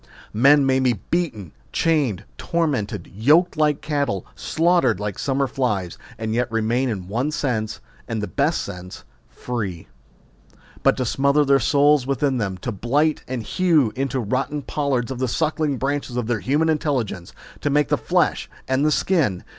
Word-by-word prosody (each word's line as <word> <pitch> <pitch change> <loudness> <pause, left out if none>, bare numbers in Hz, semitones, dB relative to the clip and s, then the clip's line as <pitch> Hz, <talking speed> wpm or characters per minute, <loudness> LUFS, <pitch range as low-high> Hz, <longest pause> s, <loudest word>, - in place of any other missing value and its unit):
Men 140 +6 +5
may 130 0 +3
be 130 -2 +3
beaten, 110 - -3 0.2
chained, 145 - +1
tormented, 150 - -2
yoked 150 - +3
like 150 -2 +1
cattle, 140 - -1
slaughtered 165 - +1
like 105 -2 -4
summer 140 0 0
flies, 105 -10 -2 0.2
and 110 0 -3
yet 125 0 0
remain 115 +3 0
in 95 -6 -4
one 120 +9 -1
sense, 115 -8 -2 0.3
and 115 -1 -2
the 105 - -2
best 140 - 0
sense, 90 -2 -8 0.3
free. 100 - -5 0.9
But - - +3
to 130 - -1
smother 140 +4 +2
their 140 0 +4
souls 145 +1 +3
within 135 -1 0
them, 95 -4 -2
to 125 - -2
blight 140 +9 0
and 125 -3 -4
hew 150 - +2
into 135 0 -1
rotting 130 +6 -2
pollards 135 -4 -1
the 130 +1 -1
suckling 155 +1 0
branches 135 -1 -2
of 120 - -1
their 115 -1 -1
human 145 +9 +1
intelligence, 130 - -1 0.3
to - - -1
make 145 -2 +2
the - - +3
flesh - - 0 0.2
and 135 +4 +2
skin 150 - +1
130 Hz, 155 wpm, -22 LUFS, 110-145 Hz, 0.9 s, Men